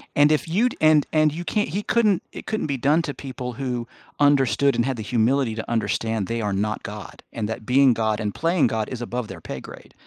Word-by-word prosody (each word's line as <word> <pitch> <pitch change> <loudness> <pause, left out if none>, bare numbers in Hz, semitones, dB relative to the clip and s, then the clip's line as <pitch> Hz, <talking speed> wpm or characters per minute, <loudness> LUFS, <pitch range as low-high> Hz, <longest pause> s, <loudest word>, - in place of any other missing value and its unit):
And 145 +1 +5
if 155 - +1
you'd 220 +9 +1
and 155 -1 +5
and 155 -1 +3
you 170 +3 -5
can't 210 -1 0
he 200 +6 -3
couldn't 215 -6 +2
it - - -8
couldn't 215 -7 -2
be 140 -2 -1
done 145 +6 +3
to 145 -4 -4
people 130 -2 -6
who 125 -2 -3 0.3
understood 140 -1 +3
and 120 +1 +1
had 135 -2 -2
the 110 - -5
humility 120 +2 +1
to 110 - -6
understand 110 -1 -1
they 115 0 -2
are 105 -1 -1
not 105 +2 -2
God 105 -1 -9
and 110 -3 -3
that 110 0 -5
being 130 +1 +5
God 110 -2 0
and 105 -2 -3
playing 165 -3 +2
God 110 -1 -2
is 125 -2 -6
above 120 0 -3
their - - -9
pay - - -6
grade, - - -12
125 Hz, 235 wpm, -23 LUFS, 110-150 Hz, 0.3 s, And